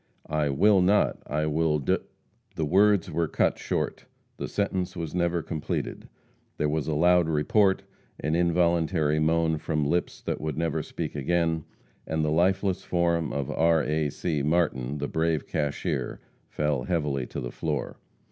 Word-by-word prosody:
"I 75 -1 +1
will 95 +8 +4
not. 100 +3 +2
I 75 +2 0
will 75 0 +1
d 70 - +1 0.3
" - - -40
The 80 - -1
words 100 +3 +3
were 85 -1 0
cut - - +1
short. - - -3 0.3
The - - -4
sentence 95 -2 -2
was 85 -3 -5
never 85 -1 0
completed. 80 -2 -4 0.5
There 75 - +1
was 75 -1 -1
a 80 - 0
loud 90 +1 +4
report, 95 +6 +2 0.4
an 75 +2 -1
involuntary 85 -2 +2
moan 80 0 +2
from 75 -2 -1
lips 85 +4 -1
that - - -3
would 75 -2 -3
never 80 -1 0
speak - - -5
again, 80 +2 0 0.4
and 80 -1 0
the 75 - 0
lifeless 95 +3 +1
form 85 -2 0
of 70 -2 -2
R. 80 0 +3
A. 75 0 0
C. 75 +1 -2
Martin, 75 -4 0
the 70 0 -2
brave 80 -2 0
cashier, 75 -2 -2 0.3
fell 75 -4 -1
heavily 75 -7 -1
to - - -6
the - - -5
floor. - - -3
80 Hz, 160 wpm, -27 LUFS, 75-85 Hz, 0.5 s, will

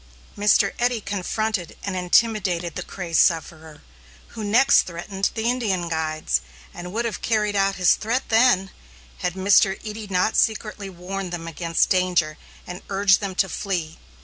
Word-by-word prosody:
Mr. 205 -1 +3
Eddy 245 -1 +1
confronted 205 -1 -3
and 195 -2 -3
intimidated 180 -2 +1
the - - -5
crazed 175 -4 -2
sufferer, 160 -2 0 0.5
who 220 - -7
next 245 +7 +5
threatened 190 +3 -3
the 220 - -2
Indian 210 -8 0
guides, 155 -1 -1 0.3
and 175 +1 -8
would 230 +4 -2
have 230 - -4
carried 210 -2 0
out 195 0 +2
his 180 -2 +4
threat 235 +4 -1
then, 220 -5 +3 0.5
had 180 0 -2
Mr. 195 0 +4
Eddy 215 0 -6
not 185 +2 0
secretly 215 -2 0
warned 185 +1 -6
them 170 -1 -5
against 165 0 0
danger 180 -4 +1 0.3
and 180 +1 -8
urged 195 -1 +3
them 195 -2 -5
to 195 - +2
flee. 175 -5 -4
195 Hz, 150 wpm, -23 LUFS, 175-215 Hz, 0.5 s, next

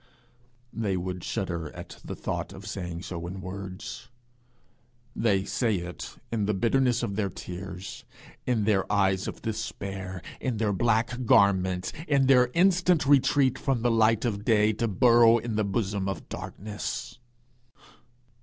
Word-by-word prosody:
They 100 -5 -1
would 90 0 -4
shudder 85 -5 -3
at - - -10
the - - -6
thought - - -4
of 100 +1 -10
saying 90 -4 -5
so 85 0 -5
in 95 +2 -6
words; 95 +1 -7 1.1
they 100 -4 +2
say 115 -2 0
it 90 0 -7 0.2
in 110 -3 0
the 105 - +1
bitterness 125 +4 +2
of 100 -4 -2
their 100 -2 0
tears, 90 +1 -7 0.4
in 120 -4 +2
their 100 -2 +1
eyes 95 -2 +2
of - - -7
despair, 95 -4 -5 0.2
in 125 -4 -2
their 105 -2 +1
black 120 +4 +1
garments, 95 -3 +3
in 140 -2 +3
their 125 -2 +5
instant 180 -2 +4
retreat 135 -1 +4
from 130 -5 0
the 120 - +3
light 115 0 +3
of 105 -3 -2
day 110 -1 +3
to 115 +2 -1
burrow 115 +3 +6
in 115 -1 -3
the 110 - +2
bosom 100 -1 -1
of 95 - -5
darkness? 105 +3 -6
105 Hz, 145 wpm, -27 LUFS, 95-120 Hz, 1.1 s, burrow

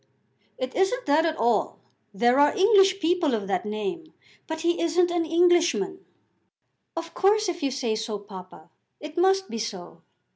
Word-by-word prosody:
"It 255 0 -4
isn't - - 0
that 310 +3 +3
at 320 - -3
all. 230 -3 0 0.3
There 240 +6 +2
are 290 +1 +3
English 390 -1 +4
people 330 -6 +1
of 205 -3 -5
that 195 +1 -2
name; 320 - -5 0.3
but 320 0 -5
he 340 +1 0
isn't 345 +1 +2
an 345 -2 -1
Englishman." 350 +2 +2 0.9
"Of 330 0 -6
course, 425 +2 +2
if 350 -1 -4
you 280 - 0
say 255 -4 -2
so, 220 -1 -3
papa, 185 -5 -13 0.3
it 305 +1 -9
must 380 +2 +2
be 230 - -4
so. 200 -5 -7
320 Hz, 160 wpm, -25 LUFS, 230-360 Hz, 0.9 s, English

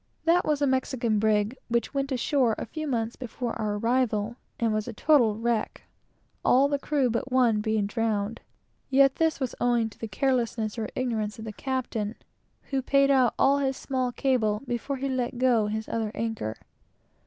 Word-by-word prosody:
That 345 +2 +4
was 295 -1 +1
a - - +5
Mexican 260 -4 0
brig, 215 +2 +2
which 235 +3 -1
went 275 0 -1
ashore 255 -2 +2
a - - -4
few 310 +7 -5
months 230 -3 -1
before 245 -1 -4
our 210 -1 -1
arrival, 230 -1 0 0.2
and 230 -2 +1
was 215 0 -1
a - - -5
total 235 -4 +3
wreck, 230 -1 -1 0.6
all 265 +3 +5
the 285 0 -1
crew 275 -4 +1
but 240 +3 -2
one 240 -4 +3
being 220 -1 0
drowned. 220 0 -1 0.5
Yet 275 0 +4
this 320 -2 +1
was 260 -3 -2
from 240 -2 +2
the 225 +1 -7
carelessness 230 -1 -1
or 220 - -3
ignorance 220 -5 -2
of 220 - -8
the 215 - -6
captain, 240 -4 -3 0.6
who 270 -1 +1
paid 275 +1 +3
out 255 -3 +3
all 280 +1 +4
his 270 -1 0
small 255 -2 -2
cable 235 -5 0
before 250 +3 -3
he 275 +1 -2
let 255 -2 -2
go 240 -4 +3
his 215 +1 -3
other 220 -2 -2
anchor. 225 - -3
240 Hz, 175 wpm, -27 LUFS, 220-265 Hz, 0.6 s, a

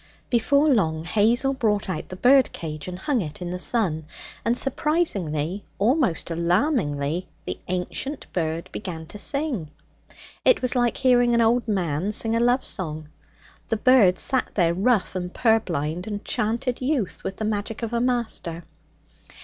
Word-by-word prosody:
Before 280 +5 +3
long 165 - +1
Hazel 235 +8 +3
brought 215 -6 0
out 185 - -4
the 185 - -6
bird 255 +5 +5
cage 155 -1 -6
and 180 0 -5
hung 250 +5 0
it 150 -4 -6
in 175 -1 -5
the 180 - -4
sun. 180 -8 0 0.4
And 235 +1 +1
surprisingly, 200 - 0
almost 230 - +1
alarmingly, 170 - 0 0.2
the - - -4
ancient 185 +10 -3
bird 165 -1 -2
began 170 -6 -6
to 205 +6 -10
sing. 275 - -1 0.7
It - - +4
was 255 - +2
like 240 -2 +1
hearing 245 -2 +4
an 235 - +4
old 235 +1 +2
man 180 -2 -1
sing 225 +1 +1
a - - +2
love 245 +2 +2
song. 155 -5 -4 0.6
The 225 - +1
bird 215 -6 +5
sat 260 -2 0
there, 170 -4 +3
rough 200 +2 +1
and 180 -1 -3
purblind, 180 - 0
and 205 -1 -5
chanted 235 +4 -1
youth 255 -6 -1
with 190 - -4
the 215 - -3
magic 215 +2 -3
of 230 0 -3
a 235 - +1
master. 235 -9 -2
210 Hz, 155 wpm, -24 LUFS, 175-245 Hz, 0.7 s, bird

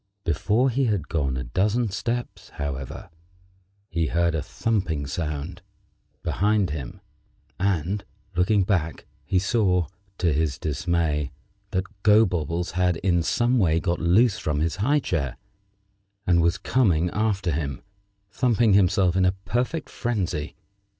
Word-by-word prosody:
Before 110 - +2
he 135 +3 +1
had 100 -9 -1
gone 70 -5 0
a 65 - -3
dozen 105 - 0
steps, 120 +5 -4
however, 70 -1 -5 0.8
he 85 -3 -1
heard 85 +1 +1
a 80 - -1
thumping 90 -5 -1
sound 75 +4 -4 0.6
behind 100 -3 +1
him, 70 -5 -6 0.6
and, 95 +1 0 0.3
looking 95 +3 +3
back, 85 -4 -1 0.2
he 95 - +1
saw, 95 -2 +2 0.3
to 85 -4 +2
his 75 -2 0
dismay, 80 -2 0 0.4
that 95 - 0 0.2
Gobobbles 90 -5 +3
had 90 -1 +1
in 85 -1 +1
some 120 +8 +2
way 85 -5 +3
got 85 0 -1
loose 95 +7 +3
from 75 -1 -1
his 80 +3 -1
high 140 +8 +2
chair, 70 - -2 0.9
and 85 -4 +4
was 85 +2 +2
coming 90 -9 +2
after 105 -4 0
him, 70 -4 -3 0.5
thumping 115 -2 +3
himself 95 -2 +3
in 95 - +3
a 90 0 +3
perfect 125 - -1
frenzy. 95 -11 -2
90 Hz, 130 wpm, -25 LUFS, 80-105 Hz, 0.9 s, and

